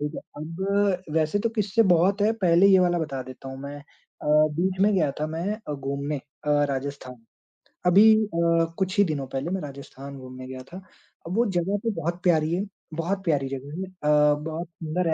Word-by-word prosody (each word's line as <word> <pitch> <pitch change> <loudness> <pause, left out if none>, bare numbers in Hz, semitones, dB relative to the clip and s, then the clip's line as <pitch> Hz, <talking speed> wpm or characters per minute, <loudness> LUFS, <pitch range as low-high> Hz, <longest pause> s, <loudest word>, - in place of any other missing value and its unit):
ठीक 150 +1 -3
है? - - -5 0.2
अब 185 +2 -1
वैसे 160 +5 +2
तो 230 - 0
किस्से 210 +2 +3
बहुत 190 +5 +2
हैं, 220 +2 +4
पहले 180 0 +5
ये 190 -1 +7
वाला 175 -1 +3
बता 140 -5 -3
देता 130 +1 -10
हूँ 135 0 -7
मैं 140 +1 -6
अ, 145 +1 -15 0.3
बीच 185 +2 0
में 210 +1 +4
गया 155 -6 +2
था 155 - 0
मैं 165 +6 -2 0.2
अ, - - -1
घूमने 140 +2 -3 0.3
अ, - - +1 0.2
राजस्थान। 135 -3 -5 0.6
अभी 205 +5 +7
अ, 170 -3 +2
कुछ 190 +2 -1
ही 205 - +7
दिनों 145 -6 -2
पहले 135 +5 -3
मैं 190 - -1
राजस्थान 140 -1 -9
घूमने 130 0 -9
गया 130 0 -7
था। 190 - -7 0.5
वो 230 +6 +2
जगह 185 +3 0
तो 230 - +1
बहुत 170 +3 -3
प्यारी 160 -2 +3
है, 190 +4 0 0.3
बहुत 185 +4 -2
प्यारी 145 -6 +1
जगह 140 +4 -6
है 190 - -5
अ, 150 -4 +3
बहुत 160 +2 -4
सुंदर 165 +1 -3
165 Hz, 195 wpm, -25 LUFS, 140-190 Hz, 0.6 s, ये